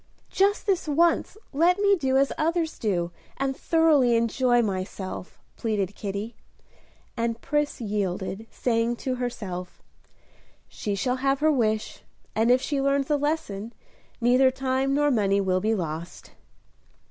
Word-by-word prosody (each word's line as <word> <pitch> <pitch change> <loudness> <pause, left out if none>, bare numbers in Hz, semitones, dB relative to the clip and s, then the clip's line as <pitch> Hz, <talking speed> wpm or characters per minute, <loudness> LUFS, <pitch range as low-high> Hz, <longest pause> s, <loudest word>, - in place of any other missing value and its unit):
"Just 400 +2 +2
this 380 -6 0
once 335 +6 +2 0.2
let 340 +6 +4
me 400 0 +4
do 265 -6 +1
as 275 0 +2
others 325 +1 -1
do, 175 -6 -1 0.3
and 270 0 -1
thoroughly 300 -8 +3
enjoy 240 +1 +2
myself." 190 -2 -5 0.2
pleaded 205 -4 -1
Kitty; 200 +3 -5 0.8
and 230 -1 -1
Pris 295 +3 -1
yielded, 200 -1 -3
saying 235 -1 0
to 255 +2 -3
herself, 190 -8 -5 0.8
"She 205 -3 -4
shall 250 +6 0
have 270 +1 +1
her 310 0 +4
wish, 220 -6 0 0.3
and 225 +2 +2
if 255 +1 +4
she 285 -2 -1
learns 275 +1 +1
a - - +4
lesson, 275 -8 -2 0.5
neither 250 +2 +5
time 265 +1 0
nor 290 0 +3
money 200 -4 +2
will 185 -1 +1
be 220 +2 +1
lost." 165 -2 -5
245 Hz, 135 wpm, -26 LUFS, 205-285 Hz, 0.8 s, neither